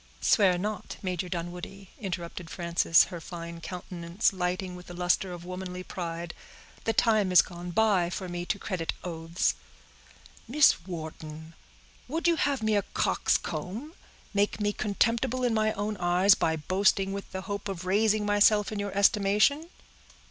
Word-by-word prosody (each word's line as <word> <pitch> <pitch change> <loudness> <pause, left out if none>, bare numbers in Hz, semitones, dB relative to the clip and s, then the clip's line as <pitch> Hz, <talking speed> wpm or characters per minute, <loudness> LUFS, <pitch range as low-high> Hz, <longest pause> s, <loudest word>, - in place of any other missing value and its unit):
"Swear 190 -4 +4
not, 210 +2 -4
Major 180 -1 -2
Dunwoodie," 180 +3 -6
interrupted 175 -4 -5
Frances, 170 -1 +3
her 170 - -6
fine 170 0 -8
countenance 180 +2 -2
lighting 180 0 -2
with 180 0 -11
the 175 - -9
luster 180 +1 +1
of 175 -1 -8
womanly 180 0 -6
pride. 170 -2 -5 0.5
"The 225 - +2
time 215 -4 +3
is 180 - +8
gone 175 0 -8
by 190 -2 +2
for 185 +1 -5
me 175 0 -4
to 200 - 0
credit 185 -5 -3
oaths." 165 0 -1 0.9
"Miss 250 - +4
Wharton, 160 -2 -7 0.5
would 325 +6 -1
you 340 -1 +3
have 280 -6 0
me 220 -1 +2
a 205 - +3
coxcomb—make 205 - -2
me 205 0 0
contemptible 230 +5 0
in 245 -2 +2
my 215 0 +2
own 210 +1 -2
eyes, 180 +3 +5
by 160 -3 +1
boasting 195 +4 +1
with 200 0 -6
the 190 - -4
hope 200 +1 -5
of 185 -2 -5
raising 210 +2 +2
myself 205 0 +4
in 210 - -3
your 200 -1 -3
estimation?" 210 +10 +3
185 Hz, 150 wpm, -28 LUFS, 175-210 Hz, 0.9 s, is